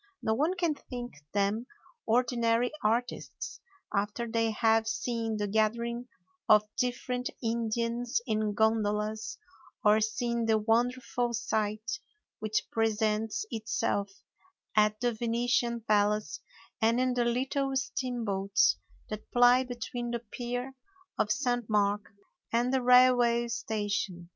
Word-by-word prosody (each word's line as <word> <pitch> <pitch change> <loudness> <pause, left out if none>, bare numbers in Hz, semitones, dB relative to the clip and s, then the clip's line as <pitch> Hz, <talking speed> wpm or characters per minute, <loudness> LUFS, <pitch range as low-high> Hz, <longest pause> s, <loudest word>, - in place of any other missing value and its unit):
No 220 - +2
one 305 +10 +1
can 340 -3 +1
think 245 -4 -7 0.2
them 205 +4 0 0.4
ordinary 240 0 +2
artistes 235 +3 -2 0.3
after 205 +4 -1
they 225 0 +1
have 225 0 +2
seen 225 -1 -2
the 205 - -1
gathering 235 +3 0 0.4
of 210 -1 +7
different 250 0 -1
Indians 230 +1 -1
in 215 -2 0
gondolas, 215 0 0 0.5
or 210 +1 +6
seen 235 +1 -1
the 220 -1 +4
wonderful 240 +2 0
sight 215 - -2 0.4
which 215 0 -1
presents 220 - 0
itself 220 -2 -1 0.7
at 215 0 +3
the 245 -1 +1
Venetian 235 +1 0
palace 210 -6 +1 0.4
and 230 +2 +3
in 255 0 +2
the 245 -1 +1
little 270 +3 0
steamboats 230 - +1 0.3
that 215 0 -6
ply 245 +1 +5
between 240 -1 -5
the 235 0 -3
pier 245 +2 -4 0.5
of 210 - +2
St. 245 -3 0
Mark 205 -1 +1 0.4
and 240 +2 +1
the 265 - +2
railway 245 -1 +5
station. 205 -5 -2
230 Hz, 115 wpm, -30 LUFS, 215-245 Hz, 0.7 s, of